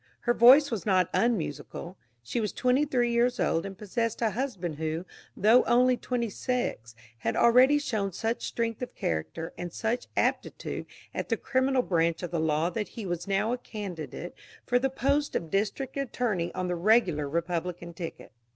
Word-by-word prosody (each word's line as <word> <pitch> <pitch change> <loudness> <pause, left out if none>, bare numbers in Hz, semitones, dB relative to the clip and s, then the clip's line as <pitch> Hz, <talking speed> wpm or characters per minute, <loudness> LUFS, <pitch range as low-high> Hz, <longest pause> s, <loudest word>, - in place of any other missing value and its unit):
Her 240 - +2
voice 265 +5 +7
was 220 -6 -2
not 185 -4 +2
unmusical. 175 - -1 0.3
She 120 - -2
was 210 - -1
twenty 255 +3 +2
three 245 -4 +1
years 240 +1 +2
old 165 +4 +1
and 195 -1 -9
possessed 225 +3 -2
a 220 - +2
husband 190 - -3
who, 160 +2 -3 0.3
though 225 +5 +6
only 250 +1 +4
twenty 245 -1 -2
six, 185 - -3 0.2
had 115 - -1
already 255 +5 +6
shown 215 -9 -1
such 225 +5 -2
strength 230 -1 -2
of 250 - -5
character 80 - -3
and 175 -1 -4
such 225 +7 -2
aptitude - - -1 0.3
at - - -4
the - - +1
criminal 260 0 +1
branch 170 -3 +1
of 175 - -4
the 170 - -1
law 160 +2 +1
that 210 0 -3
he 225 - -8
was 175 0 -3
now 200 +4 +1
a 250 - -3
candidate 200 -10 -6 0.3
for 245 0 +3
the 270 +1 +1
post 280 +3 0
of 165 -2 -2
district 220 +7 -1
attorney 240 -10 -1
on 185 - -2
the 180 - -1
regular 175 -6 +3
Republican 170 +1 -3
ticket. 165 0 -7
210 Hz, 175 wpm, -28 LUFS, 170-245 Hz, 0.3 s, voice